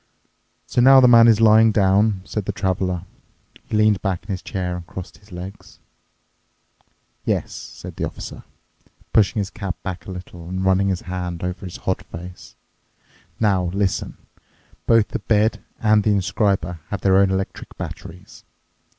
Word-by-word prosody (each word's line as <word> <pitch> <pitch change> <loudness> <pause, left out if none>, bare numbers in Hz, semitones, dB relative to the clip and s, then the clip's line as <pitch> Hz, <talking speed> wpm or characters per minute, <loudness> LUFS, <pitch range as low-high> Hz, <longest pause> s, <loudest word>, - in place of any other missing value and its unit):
"So 120 - +1
now 135 +2 +8
the 125 - +7
man 115 -1 +8
is 110 -2 +5
lying 110 0 +6
down," 100 0 +3
said 105 -3 -4
the - - -1
Traveler. 90 -1 -1 0.6
He 110 - -1
leaned 105 -2 +3
back 95 -4 -2
in 105 - -19
his 95 -1 -3
chair 90 -2 -3
and 85 -1 -8
crossed 90 0 -9
his 100 +1 -22
legs. 90 +3 -9 1.5
"Yes," - - -1
said - - -9
the - - -3
Officer, - - -8 0.7
pushing 110 +1 +3
his 100 - -5
cap 95 -3 -4
back 95 -2 -6
a - - -6
little 90 -2 -9
and 95 +1 -3
running 95 +1 +3
his 95 -2 -1
hand 90 -1 -5
over 90 +1 -4
his 90 - -8
hot 95 - -2
face. 90 +2 -11 0.8
"Now, 95 -5 +2
listen. 95 +2 -1 0.7
Both 115 -2 +4
the - - -3
bed 110 +1 +1 0.2
and 110 -1 +4
the 105 -1 +3
inscriber 95 -3 0
have 100 -3 -4
their 95 -1 +4
own 100 -1 +4
electric 95 0 -4
batteries. - - -9
95 Hz, 160 wpm, -21 LUFS, 90-105 Hz, 1.5 s, now